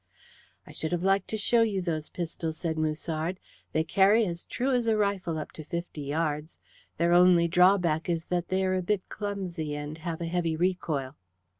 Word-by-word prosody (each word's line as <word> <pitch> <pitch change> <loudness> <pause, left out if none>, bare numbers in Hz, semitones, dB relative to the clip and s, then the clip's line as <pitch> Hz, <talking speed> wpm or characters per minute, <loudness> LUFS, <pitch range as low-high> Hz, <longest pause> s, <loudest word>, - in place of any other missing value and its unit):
"I - - -12
should 160 +2 -3
have 175 0 -1
liked 195 0 +2
to 220 - -2
show 230 +2 +3
you 215 -4 +1
those 160 -4 -3
pistols," 165 -2 -4
said 165 -2 -2
Musard. 155 +3 -2 0.3
"They 160 - +1
carry 200 +6 +4
as 170 -2 -4
true 260 +2 -1
as 245 -2 +1
a 220 -1 +3
rifle 195 -5 0
up 155 - -5
to 155 - -9
fifty 170 0 -5
yards. 150 +2 -2 0.4
Their 170 +1 +3
only 175 -1 +6
drawback 180 -2 +3
is 165 -1 -1
that 175 -1 -1
they 190 0 +1
are 185 - +1
a 185 - +1
bit 190 +1 -1
clumsy, 185 -7 -4
and 150 +2 -6
have 165 -1 -4
a 170 - -3
heavy 165 -1 0
recoil." 160 -6 -1
170 Hz, 190 wpm, -28 LUFS, 160-190 Hz, 0.4 s, only